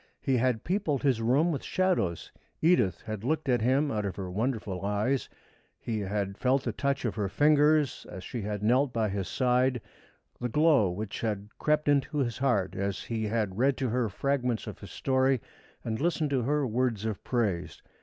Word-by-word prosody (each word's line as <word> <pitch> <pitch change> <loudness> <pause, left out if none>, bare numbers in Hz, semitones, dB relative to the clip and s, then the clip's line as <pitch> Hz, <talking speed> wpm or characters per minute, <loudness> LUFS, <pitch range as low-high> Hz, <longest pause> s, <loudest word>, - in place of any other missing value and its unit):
He 135 -2 +1
had 120 -2 +1
peopled 170 -7 -1
his 130 -5 +2
room 135 +9 +3
with 145 - -3
shadows. 180 - 0 0.3
Edith 120 - +3
had 110 -2 -6
looked 155 +3 -1
at 120 -3 +2
him 135 +5 +2
out 105 -1 -1
of 95 -3 -3
her 95 -2 -5
wonderful 105 -3 -2
eyes, 105 +7 0 0.5
he 110 -2 -3
had 100 0 -3
felt 130 +1 +2
the 120 - -1
touch 140 +4 -1
of 115 - 0
her 105 -3 -2
fingers 150 +4 +3
as 95 +1 -8
she 120 - -5
had 105 0 -4
knelt 125 +5 +3
by 110 -3 0
his 95 -2 -3
side, 125 +1 +2 0.6
the 125 - -2
glow 150 - +4
which 100 +3 -5
had 105 -2 -2
crept 150 0 +1
into 145 +1 +2
his 120 -5 -1
heart 120 -9 +1
as 100 0 -2
he 110 -2 -3
had 105 -2 -1
read 135 +1 +3
to 130 -3 -1
her 120 -1 0
fragments 125 +1 -1
of - - -8
his - - -10
story 130 -1 +1 0.4
and 110 +2 -3
listened 160 -3 0
to 135 -3 +2
her 145 +4 +1
words 115 -3 0
of 110 -3 -3
praise. 105 -9 -1
120 Hz, 190 wpm, -29 LUFS, 105-140 Hz, 0.6 s, glow